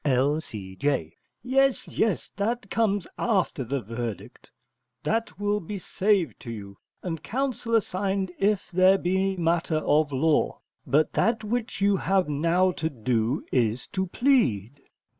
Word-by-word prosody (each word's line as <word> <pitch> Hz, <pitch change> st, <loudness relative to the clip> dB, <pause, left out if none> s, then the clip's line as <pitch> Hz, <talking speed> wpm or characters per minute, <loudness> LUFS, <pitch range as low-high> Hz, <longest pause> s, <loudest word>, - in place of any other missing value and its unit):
L.C.J. 130 Hz, -, -1 dB, 0.3 s
Yes, 270 Hz, +1 st, +2 dB
yes, 220 Hz, -5 st, -1 dB
that 215 Hz, 0 st, -2 dB
comes 205 Hz, -5 st, +1 dB
after 190 Hz, -, +1 dB
verdict: 115 Hz, -4 st, -5 dB, 0.5 s
that 225 Hz, -1 st, -1 dB
will 205 Hz, 0 st, +1 dB
be 205 Hz, +3 st, -6 dB
saved 190 Hz, -, 0 dB
to -, -, -9 dB
you, 100 Hz, -3 st, -8 dB, 0.2 s
and 165 Hz, -4 st, -4 dB
counsel 245 Hz, -2 st, -1 dB
assigned 195 Hz, -2 st, 0 dB
if 200 Hz, -1 st, +1 dB
there 185 Hz, +2 st, +5 dB
be 190 Hz, +1 st, 0 dB
matter 165 Hz, -1 st, +1 dB
of 150 Hz, -1 st, +2 dB
law: 145 Hz, +3 st, +1 dB, 0.3 s
but 155 Hz, +2 st, +2 dB
that 225 Hz, +3 st, +1 dB
which 225 Hz, -1 st, -3 dB
you 200 Hz, 0 st, +4 dB
have 190 Hz, -2 st, +1 dB
now 170 Hz, +5 st, +2 dB
to 160 Hz, -2 st, -2 dB
do 120 Hz, 0 st, -1 dB
is 120 Hz, -1 st, +1 dB
to 190 Hz, 0 st, -2 dB
plead. 140 Hz, -, +1 dB
180 Hz, 130 wpm, -26 LUFS, 135-205 Hz, 0.5 s, there